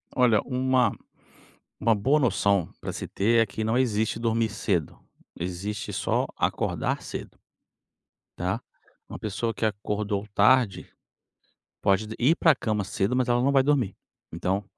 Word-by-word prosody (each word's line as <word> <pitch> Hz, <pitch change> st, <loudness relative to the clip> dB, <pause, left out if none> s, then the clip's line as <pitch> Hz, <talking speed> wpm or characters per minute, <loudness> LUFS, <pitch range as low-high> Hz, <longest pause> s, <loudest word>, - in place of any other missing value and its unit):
Olha, 120 Hz, -5 st, +4 dB
uma 130 Hz, -1 st, +1 dB, 0.9 s
uma 115 Hz, 0 st, +4 dB
boa 135 Hz, +9 st, +2 dB
noção 100 Hz, -, +2 dB
pra -, -, -5 dB
se -, -, -6 dB
ter 115 Hz, +3 st, +3 dB
é -, -, 0 dB
que 110 Hz, +3 st, -4 dB
não 110 Hz, +2 st, +1 dB
existe 110 Hz, -3 st, +1 dB
dormir 115 Hz, -1 st, +1 dB
cedo, 95 Hz, -7 st, -1 dB, 0.4 s
existe 95 Hz, +4 st, -4 dB
só -, -, 0 dB
acordar -, -, -1 dB
cedo -, -, -8 dB, 1.0 s
tá. 95 Hz, +7 st, -1 dB, 0.5 s
Uma -, -, -7 dB
pessoa 110 Hz, +2 st, -2 dB
que 110 Hz, -, -2 dB
acordou 105 Hz, 0 st, -2 dB
tarde 110 Hz, 0 st, +3 dB, 0.9 s
pode 100 Hz, +2 st, +2 dB
ir 140 Hz, +7 st, +4 dB
pra 160 Hz, -2 st, +5 dB
cama 110 Hz, -6 st, -1 dB
cedo, 100 Hz, +5 st, -1 dB
mas 130 Hz, -1 st, +1 dB
ela 120 Hz, 0 st, +2 dB
não 140 Hz, +2 st, +3 dB
vai 135 Hz, -1 st, +4 dB
dormir. 130 Hz, -8 st, +1 dB, 0.4 s
Então, 95 Hz, +3 st, -1 dB
110 Hz, 140 wpm, -26 LUFS, 100-125 Hz, 1.0 s, pra